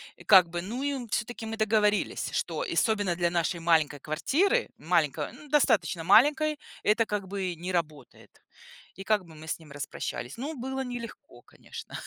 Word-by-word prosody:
И - - -15
как 185 -4 +7
бы, 175 0 -3
ну, 230 +9 -5
и 285 0 0
мы, 250 -3 -6
всё-таки, 230 +1 -3
мы 225 0 -5
договорились, 215 -1 +1
что, - - -2
особенно 205 -5 +1
для 175 -1 +2
нашей 170 0 -1
маленькой 160 -3 +2
квартиры, 320 - +1
маленькой, - - 0
ну, 295 - -14
достаточно 230 - +2
маленькой, 295 - +5 0.3
это 220 +2 +3
как 205 -2 -3
бы 190 -2 -3
не 180 +3 -5
работает. 150 -6 -5 0.5
И 195 - -8
как 205 -2 +1
бы 160 -2 -15
мы 155 +1 -11
с - - -2
ним 155 -3 -16
распрощались. 140 - -5
Ну, 290 +6 -4
было 265 +1 -4
нелегко, 245 -2 -8
конечно, - - -12
205 Hz, 175 wpm, -28 LUFS, 170-245 Hz, 0.5 s, как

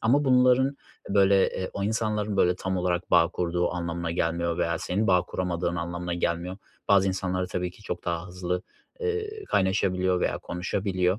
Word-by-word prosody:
ama 135 +6 +3
bunların 130 +1 +4 0.3
böyle, 100 -1 +4
eee, 95 - -4
o 100 - -3
insanların 105 -1 -1
böyle 90 -2 +3
tam 95 +1 -2
olarak 90 0 -1
bağ 85 - +5
kurduğu 90 0 -1
anlamına 85 -1 -3
gelmiyor 85 0 -1
veya 85 -1 0
senin 100 +7 -1
bağ 90 -3 +4
kuramadığın 90 -1 -2
anlamına 85 0 -3
gelmiyor. 85 +1 -2 0.3
Bazı 100 -1 +5
insanlar 95 -1 -1
tabii 90 0 -3
ki 100 - -18
çok 90 -3 -5
daha 85 0 -2
hızlı, 90 0 -3 0.4
eee, 435 -2 -3
kaynaşabiliyor 95 - +1
veya - - 0
konuşabiliyor. 95 +1 -1
90 Hz, 160 wpm, -27 LUFS, 90-100 Hz, 0.4 s, bağ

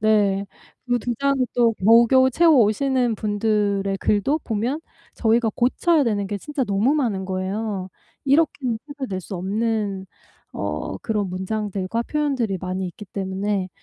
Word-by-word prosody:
네 205 -2 +2 0.4
그 245 0 +2
2 240 +1 -3
장을 275 0 +2 0.2
또 235 -2 +4
겨우겨우 235 +6 +5
채워 325 +2 +5
오시는 245 +2 +1
분들의 205 -2 0
글도 215 +9 +1
보면 235 +7 -1 0.3
저희가 225 0 +2
고쳐야 300 +6 +2
되는 205 -3 0
게 205 +1 -3
진짜 285 - -3
너무 210 +7 +2
많은 220 -10 -1
거예요. 190 +1 -3 0.4
이렇게는 275 -5 +2
책을 280 -3 -6
낼 185 -1 -3
수 185 - -8
없는 200 0 -1 0.5
어 75 +5 -3
그런 210 -3 -2
문장들과 200 +2 -2
표현들이 260 -8 -1
많이 185 0 -3
있기 195 +4 -9
때문에 195 0 -2
215 Hz, 290 characters per minute, -22 LUFS, 195-245 Hz, 0.5 s, 겨우겨우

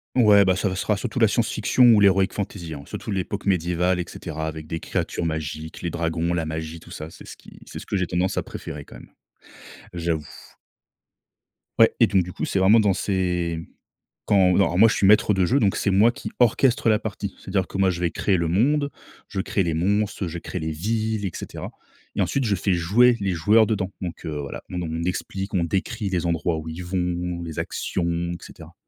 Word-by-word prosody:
Ouais, 105 -5 +6
bah 95 -1 +3
ça 100 +1 0
va 95 - -3
ça 95 - -2
sera 105 - +1
surtout 120 +3 -5
la 115 -3 +5
science 115 +2 0
fiction 125 +4 +3
ou 115 -3 +7
l'héroïque 95 -1 +4
fantaisie, 90 -5 -5
hein, 70 - -9
surtout - - -7
l'époque 100 +1 -3
médiévale, 90 0 +1
et 90 - -2
cetera, 80 -1 -6
avec 80 -1 -6
des 80 - -4
créatures 85 - -3
magiques, 80 0 -4
les 85 - -2
dragons, 85 +1 -1
la 80 -2 -1
magie, 80 +1 -5
tout - - -15
ça, 75 +1 -7
c'est - - -13
ce - - -9
qui - - -16
c'est - - -8
ce - - -11
que - - -2
j'ai 90 - 0
tendance 90 +2 -1
à - - 0
préférer 70 -1 -8
quand - - -12
même, - - -15 0.9
j'avoue. 80 -3 -2 1.5
Ouais 115 - +7
et 115 - +7
donc 95 -3 +2
du 90 - -8
coup, - - -3
c'est 95 - -1
vraiment 105 +5 +6
dans 100 -3 +3
ces 90 -4 -1 0.7
quand 95 -3 +4
alors 90 -3 +2
moi 115 +3 +8
je 115 - +1
suis 100 - +2
maître 105 0 +5
de 95 -2 +2
jeu, 135 +9 +2
donc 100 -4 +2
c'est - - 0
moi 100 +5 +5
qui - - -7
orchestre 125 +2 +3
la 110 -1 +4
partie, 105 -3 -5
c'est - - -11
à - - -5
dire 95 -2 +1
que, - - -6
moi 95 -1 +3
je 90 -1 -2
vais 85 -2 0
créer 95 +3 +1
le 85 - 0
monde, 140 - +2 0.4
je 95 -1 -3
crée 100 -1 0
les 85 -2 -1
monstres, 100 +2 0
je 85 +1 -5
crée 90 - -5
les 80 0 -3
villes, 110 +5 -2
et 95 - -2
cetera, - - -7 0.5
et - - 0
ensuite, 135 -3 0
je 100 -2 +2
fais 95 +2 -1
jouer 115 +9 +4
les 100 -2 -1
joueurs 105 +7 +4
dedans, 100 -3 -1
donc 90 -2 -6
heu, 75 -2 -4
voilà, 70 -1 -6
on 85 -2 -3
explique, 95 +2 -3
on 85 -3 +1
décrit 95 +4 -2
les 90 -2 -1
endroits 85 0 0
où 80 - -7
ils 80 +3 -6
vont, 90 -1 -2
les 80 -2 -5
actions, 85 -1 -2
et 85 - -4
cetera. - - -13
95 Hz, 230 wpm, -23 LUFS, 85-105 Hz, 1.5 s, moi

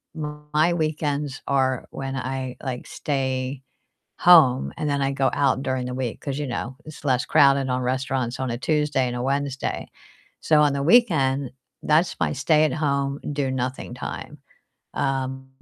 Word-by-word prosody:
my 150 +1 -1
weekends 150 -3 -2
are 130 -2 +1
when 135 0 -5
I, 130 0 -4
like, 130 -3 -5
stay 130 -1 -2 0.6
home, 155 -8 +6
and 150 -1 -2
then 140 - 0
I 135 0 +1
go 135 -1 +1
out 135 -1 +2
during 130 -2 -2
the 125 - -4
week 125 -3 -3
'cause, 140 -2 -4
you 150 - -2
know, 125 +1 -4
it's 155 -1 -11
less 130 -3 +2
crowded 140 -3 +4
on 125 0 0
restaurants 130 -1 -2
on 130 - -2
a 120 - -3
Tuesday 150 -1 +1
and 120 - -4
a 120 - -3
Wednesday. 135 0 -2 0.5
So, 150 -1 +4
on 145 - +3
the 140 - -1
weekend, 140 - +3 0.3
that's 160 +3 +2
my - - +1
stay-at-home, 145 -2 +1
do-nothing 130 -3 -2
time. 150 +4 -7 0.6
Um, 135 -1 -2
135 Hz, 155 wpm, -24 LUFS, 130-150 Hz, 0.6 s, home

